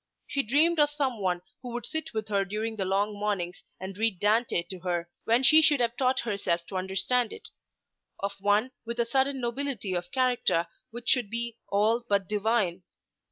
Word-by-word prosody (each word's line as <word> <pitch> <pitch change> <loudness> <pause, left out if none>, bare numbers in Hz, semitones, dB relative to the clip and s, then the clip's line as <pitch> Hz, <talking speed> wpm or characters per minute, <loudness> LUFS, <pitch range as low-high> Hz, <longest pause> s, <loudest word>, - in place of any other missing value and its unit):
She 280 - 0
dreamed 305 +7 +3
of 295 -1 +5
some 275 -6 -1
one 180 -2 -1 0.2
who 245 -2 -6
should 240 - -6
sit 315 0 -3
with 220 -1 -4
her 200 -1 +2
during 215 +3 -3
the 195 -3 -2
long 200 +3 +1
mornings 200 -3 -2 0.2
and 190 +1 -6
read 220 -5 +1
Dante 215 -3 +2
to 180 +1 -8
her, 175 -1 -2 0.2
when 235 +3 +3
she 310 +5 +7
should 295 -3 +4
have 235 -1 +1
taught 255 0 +2
herself 200 -6 -1
to 195 - -7
understand 190 +6 0
it; - - -8 0.7
of 200 0 -1
some 195 - -23
one 210 +5 +3
with 235 +1 -5
a 235 - +3
hidden 270 +3 +1
nobility 240 -5 -2
of 175 -1 -3
character 250 -10 +2 0.2
which 235 +1 -9
should 245 -6 +3
be 235 +1 -3
all 220 +4 +2
but 200 -2 +2
divine. 210 -3 0
220 Hz, 195 wpm, -28 LUFS, 195-245 Hz, 0.7 s, she